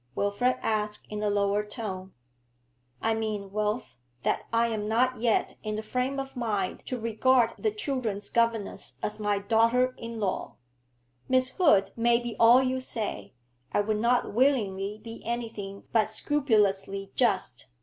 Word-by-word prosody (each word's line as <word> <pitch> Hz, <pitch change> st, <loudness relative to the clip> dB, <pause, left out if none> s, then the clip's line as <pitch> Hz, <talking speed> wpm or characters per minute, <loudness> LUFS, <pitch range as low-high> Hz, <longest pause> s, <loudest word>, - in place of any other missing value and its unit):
Wilfrid 205 Hz, +6 st, +1 dB
asked 210 Hz, -1 st, -1 dB
in 210 Hz, 0 st, -3 dB
a 210 Hz, -, +1 dB
lower 205 Hz, 0 st, +1 dB
tone. 195 Hz, -4 st, -6 dB, 0.9 s
'I 225 Hz, -, +2 dB
mean, 215 Hz, -3 st, -3 dB
Wilf, 210 Hz, -, -2 dB, 0.2 s
that -, -, 0 dB
I 230 Hz, +1 st, +3 dB
am 210 Hz, -2 st, -2 dB
not 250 Hz, +2 st, +2 dB
yet 230 Hz, -2 st, +1 dB
in 215 Hz, -1 st, -3 dB
the 215 Hz, -, -4 dB
frame 250 Hz, +5 st, -1 dB
of 270 Hz, 0 st, -6 dB
mind 210 Hz, -6 st, -2 dB
to 255 Hz, -, -3 dB
regard 230 Hz, +2 st, +3 dB
the 435 Hz, -, +1 dB
children's 255 Hz, -, -2 dB
governess 230 Hz, -3 st, 0 dB
as 210 Hz, -, -2 dB
my 205 Hz, -1 st, +1 dB
daughter 230 Hz, +5 st, +3 dB
in 230 Hz, -1 st, -6 dB
law. 200 Hz, -3 st, -2 dB, 0.7 s
Miss 255 Hz, 0 st, +3 dB
Hood 200 Hz, -, +3 dB
may 235 Hz, 0 st, +3 dB
be 240 Hz, -1 st, -5 dB
all 240 Hz, +3 st, +7 dB
you 260 Hz, 0 st, 0 dB
say; 225 Hz, -, -5 dB, 0.4 s
I -, -, +3 dB
would 210 Hz, +1 st, -1 dB
not 240 Hz, -1 st, +2 dB
willingly 210 Hz, -5 st, +1 dB
be 230 Hz, 0 st, -8 dB
anything 225 Hz, -4 st, -4 dB
but 215 Hz, -2 st, +3 dB
scrupulously 205 Hz, -7 st, +1 dB
just. 190 Hz, -, +1 dB
220 Hz, 150 wpm, -28 LUFS, 205-245 Hz, 0.9 s, all